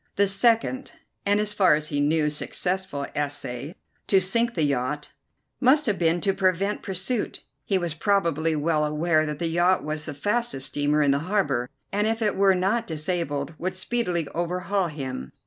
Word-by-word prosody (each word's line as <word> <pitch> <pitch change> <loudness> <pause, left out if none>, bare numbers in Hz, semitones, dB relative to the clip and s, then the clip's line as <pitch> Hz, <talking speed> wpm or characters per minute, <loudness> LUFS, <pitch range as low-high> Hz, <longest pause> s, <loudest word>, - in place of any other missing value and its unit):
The 200 - +4
second, 230 +7 +1 0.3
and, 205 +1 +3
as 210 0 -1
far 185 -6 +5
as 150 0 -3
he 145 - -1
knew, 150 +1 +2
successful, 180 -1 -2
essay 145 +1 -4 0.3
to 195 - +5
sink 230 +6 +1
the 160 - +1
yacht, 145 +1 -1 0.5
must 285 +4 +4
have 210 -4 0
been 170 0 +2
to 195 - +1
prevent 190 +2 0
pursuit. 195 +5 -2 0.2
He 195 - +2
was 175 -3 -2
probably 165 -3 +1
well 155 0 +1
aware 155 +1 +1
that 150 -1 -3
the 170 - -2
yacht 175 +3 +2
was 155 0 -4
the 150 - -6
fastest 205 - -1
steamer 145 +2 +1
in 140 - +3
the 140 - +2
harbour, 140 -12 +1 0.2
and, 205 +2 +1
if 225 +1 0
it 210 - +1
were 195 -1 +4
not 200 +6 0
disabled, 155 -3 -2
would 185 +1 -2
speedily 185 -6 -1
overhaul 180 +3 -1
him. 130 - -6
175 Hz, 175 wpm, -25 LUFS, 150-200 Hz, 0.5 s, far